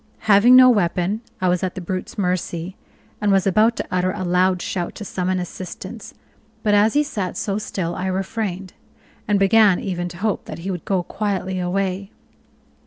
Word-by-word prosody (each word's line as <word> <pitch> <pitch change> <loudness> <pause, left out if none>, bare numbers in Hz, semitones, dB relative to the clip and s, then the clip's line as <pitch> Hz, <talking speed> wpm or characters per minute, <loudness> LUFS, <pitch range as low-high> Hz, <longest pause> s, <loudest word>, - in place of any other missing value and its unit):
Having 215 +4 +6
no 255 0 +9
weapon, 200 -2 +1 0.2
I 185 - +2
was 180 0 +1
at 185 -1 -3
the - - -4
brute's 185 +1 -5
mercy, 180 -1 -2 0.5
and 205 -1 +2
was 195 0 +3
about 215 +4 +3
to - - -4
utter 185 0 +1
a 185 - -4
loud 180 +1 +2
shout 175 0 -3
to 210 - -7
summon 185 -1 -1
assistance, 180 +1 -8 0.5
but 210 -2 +2
as 210 +3 +4
he 295 - +4
sat 205 - -4
so 200 0 -2
still 175 -5 -3
I 185 - -3
refrained, 190 -1 -3 0.5
and 210 -1 +3
began 195 -1 +5
even 175 -2 -3
to 175 - -10
hope 210 +2 -1
that - - -7
he 195 - -1
would 175 -3 -6
go 190 -4 0
quietly 190 -1 -2
away. 190 +1 -2
190 Hz, 180 wpm, -21 LUFS, 180-205 Hz, 0.5 s, no